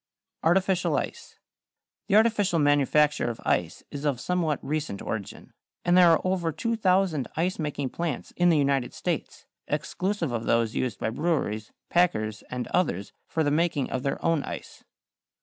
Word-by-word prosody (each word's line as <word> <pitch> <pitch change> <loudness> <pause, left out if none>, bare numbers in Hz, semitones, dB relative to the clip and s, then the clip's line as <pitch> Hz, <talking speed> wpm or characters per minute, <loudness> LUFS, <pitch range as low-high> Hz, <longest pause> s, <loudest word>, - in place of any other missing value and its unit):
=Artificial 185 +2 +2
Ice.= - - -5 0.7
The 205 - +2
artificial 215 -5 +3
manufacture 145 -1 +3
of 115 - -5
ice - - 0
is 145 0 -6
of 140 -5 0
somewhat 165 -2 0
recent 150 -9 -2
origin, 105 -4 -6 0.3
and 175 - +4
there 180 -1 +7
are 165 - +4
over 185 -3 0
2,000 185 - +1
ice 175 +3 0
making 145 -3 -2
plants 170 -6 -3
in 175 0 +4
the 165 - +4
United 140 -3 +1
States, - - -3 0.2
exclusive 185 -6 -2
of 115 -1 -3
those 115 -1 +2
used 120 -6 -1
by 110 - -2
breweries, 120 -8 -1 0.2
packers, 110 -12 +1
and 125 -1 -3
others 100 - 0
for 160 - 0
the 145 - +1
making 155 -3 +1
of 130 - -1
their 140 - -1
own 165 -3 +3
ice. - - -8
155 Hz, 155 wpm, -27 LUFS, 130-175 Hz, 0.7 s, there